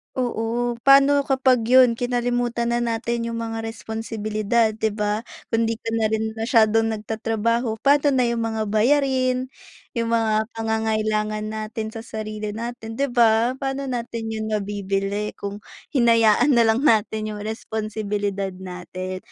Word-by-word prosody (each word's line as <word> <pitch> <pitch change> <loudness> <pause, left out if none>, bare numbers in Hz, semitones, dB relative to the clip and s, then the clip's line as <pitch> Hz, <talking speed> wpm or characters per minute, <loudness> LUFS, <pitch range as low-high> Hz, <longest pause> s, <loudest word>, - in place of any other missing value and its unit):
Oo. 240 -1 -1
Paano 275 +1 +6
kapag 260 -4 +2
yun, 250 -1 +5
kinalimutan 245 -1 -1
na 235 - +1
natin 235 0 -1
yung 230 - -3
mga 225 0 -4
responsibilidad, 220 0 -1
'di 220 -1 -2
ba? 210 +1 -2 0.2
Kung 225 0 +1
di 225 - 0
ka 225 0 -6
na 225 -1 0
rin 220 0 -1
masyadong 225 -1 +3
nagtatrabaho, 225 +1 -1
paano 285 0 +4
na 255 - +3
yung 235 -1 0
mga 220 -2 -2
bayarin, 255 +2 +2 0.5
yung 230 0 0
mga 220 -1 +2
pangangailangan 215 -1 -1
natin 220 0 -4
sa 225 +1 -8
sarili 215 -1 -5
natin, 230 0 -6
'di 275 +3 -1
ba? 235 +1 +3
Paano 270 0 -3
natin 230 -2 -4
yun 220 0 -3
mabibili 200 0 -2
kung 200 0 -6 0.3
hinayaan 235 +1 +4
nalang 235 +3 +3
natin 215 -1 +2
yung 210 - -7
responsibilidad 210 -2 -3
natin? 185 0 -6
225 Hz, 135 wpm, -23 LUFS, 215-240 Hz, 0.5 s, Paano